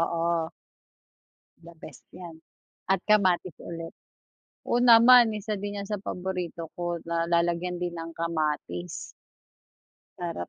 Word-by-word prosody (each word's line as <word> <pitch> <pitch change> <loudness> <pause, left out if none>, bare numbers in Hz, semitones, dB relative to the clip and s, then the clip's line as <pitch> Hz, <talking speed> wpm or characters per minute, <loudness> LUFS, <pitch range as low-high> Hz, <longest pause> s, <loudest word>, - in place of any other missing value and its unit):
oo. 165 -1 0 1.1
The 170 0 -14
best 155 -3 -12 0.2
yan, 170 -3 -10 0.5
at 190 -1 +1
kamatis 185 -5 +2
ulit. 165 -1 -7 0.7
Oo 240 - +1
naman, 235 -1 +7
isa 210 +1 -4
din 205 0 -4
yan 200 - -4
sa 205 -1 -4
paborito 180 -4 -5
ko 175 -1 -3
na 170 0 -1
lalagyan 175 +1 0
din 175 0 -3
ng 165 -1 -6
kamatis. 150 - -2 1.3
Sarap 170 - -4
175 Hz, 120 wpm, -27 LUFS, 165-195 Hz, 1.3 s, naman